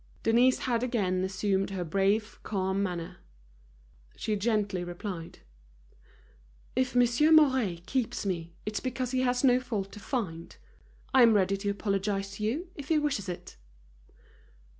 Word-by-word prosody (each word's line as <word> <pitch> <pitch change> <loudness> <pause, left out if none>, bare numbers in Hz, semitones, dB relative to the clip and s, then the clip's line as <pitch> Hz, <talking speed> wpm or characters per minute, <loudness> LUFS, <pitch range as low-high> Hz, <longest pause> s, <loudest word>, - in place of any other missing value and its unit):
Denise 245 +3 +4
had 235 -2 -1
again 195 -7 0
assumed 190 +1 0
her 190 -2 -3
brave, 195 +5 0
calm 190 -1 -1
manner. 175 -4 -3 1.0
She 215 - -2
gently 205 -3 0
replied: 175 -1 -6 1.4
"If 255 0 0
Monsieur 245 +5 +4
Mouret 260 - +4
keeps 250 -4 -2
me, 170 -3 -3
it's 210 -1 -2
because 255 -1 -3
he 260 -1 +1
has 245 0 +1
no 250 -2 +5
fault 210 -6 -4
to - - -10
find. 185 -9 -4 0.6
I 260 - +6
am 230 -2 +7
ready 195 -1 +3
to 200 +1 -2
apologize 195 -1 -2
to 210 - -5
you, 295 - -2
if 285 -2 -8
he 320 - +3
wishes 280 -10 -1
it." 175 - -7
210 Hz, 140 wpm, -29 LUFS, 190-250 Hz, 1.4 s, am